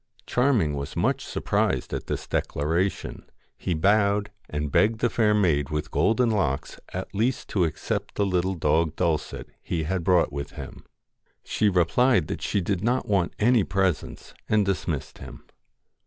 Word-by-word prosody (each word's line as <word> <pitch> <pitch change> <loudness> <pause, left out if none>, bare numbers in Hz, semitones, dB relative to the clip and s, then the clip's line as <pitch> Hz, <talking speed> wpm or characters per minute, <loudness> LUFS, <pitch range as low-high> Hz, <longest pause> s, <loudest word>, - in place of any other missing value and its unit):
Charming 120 - +2
was 70 0 -5
much - - 0
surprised - - -1
at - - -4
this - - -3
declaration. 85 +7 -1 0.3
He 90 - -2
bowed, 100 +3 +2 0.2
and 75 -1 -3
begged 110 +7 +3
the 120 +1 0
fair 105 -2 +3
maid 80 -9 +2
with 75 +1 -3
golden 115 +1 +2
locks 70 -11 -1
at 95 +1 -5
least 115 +5 -1
to 90 -4 +2
accept 80 - -3
the 100 - +1
little 95 0 0
dog 80 0 +1
Dulcet 85 -3 -2
he 80 -2 -2
had 90 +2 -2
brought 90 -4 +3
with 70 0 -5
him. - - -9 0.6
She 105 - +1
replied 90 +3 +3
that - - -4
she 100 - 0
did 95 +1 -2
not 125 +3 0
want 95 -4 +1
any 115 0 +4
presents, 95 -3 -2 0.2
and 105 -1 +3
dismissed 85 -7 -3
him. - - -10
95 Hz, 155 wpm, -25 LUFS, 80-105 Hz, 0.6 s, any